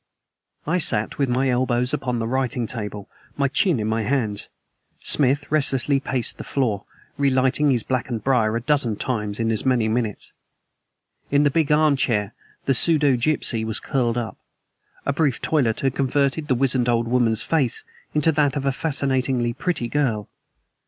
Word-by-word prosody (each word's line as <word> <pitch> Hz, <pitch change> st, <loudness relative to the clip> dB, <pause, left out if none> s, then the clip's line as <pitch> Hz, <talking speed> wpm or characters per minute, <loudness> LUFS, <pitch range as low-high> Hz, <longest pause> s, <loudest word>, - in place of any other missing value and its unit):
I 170 Hz, +4 st, +1 dB
sat 110 Hz, -7 st, 0 dB
with 140 Hz, -2 st, +1 dB
my 130 Hz, +2 st, +1 dB
elbows 125 Hz, +1 st, 0 dB
upon 125 Hz, -4 st, -1 dB
the 115 Hz, -, -2 dB
writing 125 Hz, -1 st, -1 dB
table, 105 Hz, -3 st, -6 dB, 0.3 s
my 140 Hz, -1 st, +2 dB
chin 150 Hz, -, +1 dB
in 105 Hz, -, -2 dB
my 110 Hz, +1 st, 0 dB
hands; 110 Hz, -3 st, -1 dB, 0.5 s
Smith 145 Hz, +1 st, +2 dB
restlessly 140 Hz, -2 st, +2 dB
paced 130 Hz, -4 st, -2 dB
the -, -, -5 dB
floor, 110 Hz, -8 st, -1 dB, 0.3 s
relighting 135 Hz, +1 st, +2 dB
his 125 Hz, -4 st, +2 dB
blackened 120 Hz, -3 st, -3 dB
briar 115 Hz, -5 st, +2 dB
a 115 Hz, -, -1 dB
dozen 130 Hz, -4 st, +1 dB
times 105 Hz, -3 st, -2 dB
in 115 Hz, 0 st, 0 dB
as 110 Hz, -, -1 dB
many 125 Hz, -4 st, +2 dB
minutes. 110 Hz, -2 st, -2 dB, 1.0 s
In 145 Hz, +1 st, +3 dB
the 145 Hz, -, +3 dB
big 155 Hz, 0 st, +1 dB
arm 150 Hz, -1 st, +4 dB
chair 105 Hz, -5 st, 0 dB, 0.3 s
the 135 Hz, -, +2 dB
pseudogypsy 140 Hz, -4 st, +3 dB
was 110 Hz, -1 st, 0 dB
curled 120 Hz, -3 st, -1 dB
up. 115 Hz, -2 st, -4 dB, 0.7 s
A 140 Hz, -, 0 dB
brief 145 Hz, -4 st, 0 dB
toilet 130 Hz, -8 st, 0 dB
had 135 Hz, -2 st, 0 dB
converted 140 Hz, +3 st, 0 dB
the 130 Hz, -, +2 dB
wizened 125 Hz, -1 st, +1 dB
old 115 Hz, -1 st, +1 dB
woman's 120 Hz, -2 st, +1 dB
face 145 Hz, -8 st, 0 dB, 0.3 s
into 150 Hz, +2 st, +3 dB
that 145 Hz, -3 st, +1 dB
of 140 Hz, -1 st, -3 dB
a 135 Hz, -, +2 dB
fascinatingly 130 Hz, -4 st, 0 dB
pretty 150 Hz, -4 st, -2 dB
girl. 115 Hz, -6 st, -1 dB
130 Hz, 165 wpm, -22 LUFS, 115-140 Hz, 1.0 s, arm